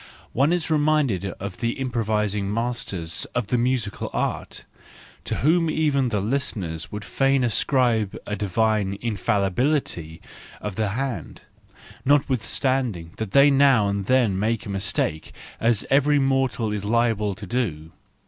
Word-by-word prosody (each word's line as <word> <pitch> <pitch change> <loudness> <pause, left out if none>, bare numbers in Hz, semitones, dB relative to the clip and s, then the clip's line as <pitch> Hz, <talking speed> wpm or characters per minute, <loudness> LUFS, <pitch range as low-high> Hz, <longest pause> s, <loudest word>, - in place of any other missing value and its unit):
One 140 +6 +3
is 175 -2 0
reminded 145 - +2
of 100 -1 -6
the 115 0 -1
improvising 105 -5 -1
masters 115 -8 -2
of 125 -2 0
the 125 - +2
musical 120 -4 -1
art, - - -3 0.6
to - - -1
whom 165 +1 +3
even 145 -5 +1
the 105 -3 0
listeners 100 - -2
would 105 0 -6
fain 135 -1 +2
ascribe 120 -3 +1
a 105 - -3
divine 105 0 0
infallibility 100 - -1 0.4
of 105 -3 -5
the 110 -1 0
hand, 130 +4 -4 0.6
notwithstanding 130 - 0
that 110 -2 -3
they 140 +7 +6
now 135 -7 +4
and 100 -1 -2
then 120 -7 +3
make 110 +1 -1
a - - -7
mistake, 95 -5 -2 0.3
as 115 -2 +2
every 145 +2 +4
mortal 135 -4 +1
is 105 -1 -3
liable 110 -2 +1
to 100 +1 -9
do. 90 -8 -3
115 Hz, 135 wpm, -24 LUFS, 100-135 Hz, 0.6 s, they